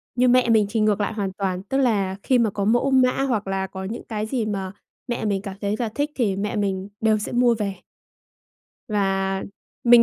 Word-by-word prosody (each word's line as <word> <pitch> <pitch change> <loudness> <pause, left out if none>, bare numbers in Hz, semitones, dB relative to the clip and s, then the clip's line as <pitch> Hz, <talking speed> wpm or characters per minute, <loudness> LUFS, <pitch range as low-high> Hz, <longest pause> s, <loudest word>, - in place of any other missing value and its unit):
nhưng 250 0 +4
mẹ 250 -2 +4
mình 220 -2 +5
thì 225 +2 -1
ngược 215 -1 +2
lại 205 - -1
hoàn 200 -3 -2
toàn, 190 -2 -2
tức 265 +7 -2
là 205 -8 +1
khi 255 -2 +3
mà 225 -2 +3
có 200 0 -2
mẫu 240 +5 +2
mã, 255 -1 +5
hoặc 225 -7 -1
là 195 0 -1
có 190 0 -7
những 215 +5 -5
cái 215 -2 -3
gì 225 0 -1
mà 195 -3 -3 0.4
mẹ 240 -2 -2
mình 200 -2 0
cảm 195 -2 -6
thấy 205 0 0
là 235 -3 -1
thích 290 +2 -1
thì 210 -7 +1
mẹ 205 +1 -2
mình 195 -1 -1
đều 220 -1 +3
sẽ 210 - -4
mua 240 -1 +4
về. 200 -3 -2 1.1
Và 195 -2 0 0.4
mình 240 0 +8
210 Hz, 220 wpm, -23 LUFS, 195-240 Hz, 1.1 s, mình